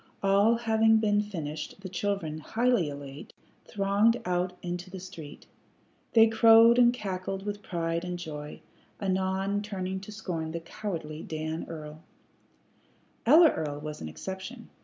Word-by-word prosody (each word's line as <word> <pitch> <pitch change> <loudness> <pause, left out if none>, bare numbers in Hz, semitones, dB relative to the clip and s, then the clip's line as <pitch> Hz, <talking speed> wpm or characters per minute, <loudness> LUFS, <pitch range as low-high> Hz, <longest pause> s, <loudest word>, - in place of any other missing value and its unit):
All 200 +4 +4
having 225 -1 +3
been 210 -1 +2
finished, 160 -4 -6
the 190 - -6
children, 180 -4 -2
highly 230 -2 +1
elate, 140 0 -9 0.3
thronged 205 +3 +2
out 180 0 0
into 175 +1 -4
the 190 0 -7
street. 170 -5 -10 0.7
They 225 -1 +8
crowed 225 +1 +6
and 240 -1 +7
cackled 195 -4 -4
with 205 0 -4
pride 170 -2 -2
and 180 0 -4
joy, 150 -4 -7 0.4
anon 190 +1 0
turning 190 -2 -4
to 195 +2 -10
scorn 170 -7 -4
the 170 - -3
cowardly 165 -3 -6
Dan 155 +1 -4
Earl. 155 -1 -8 1.3
Ella 315 +4 +8
Earl 145 -2 -4
was 150 0 -6
an 80 - -5
exception. 190 - -8
190 Hz, 140 wpm, -28 LUFS, 160-210 Hz, 1.3 s, They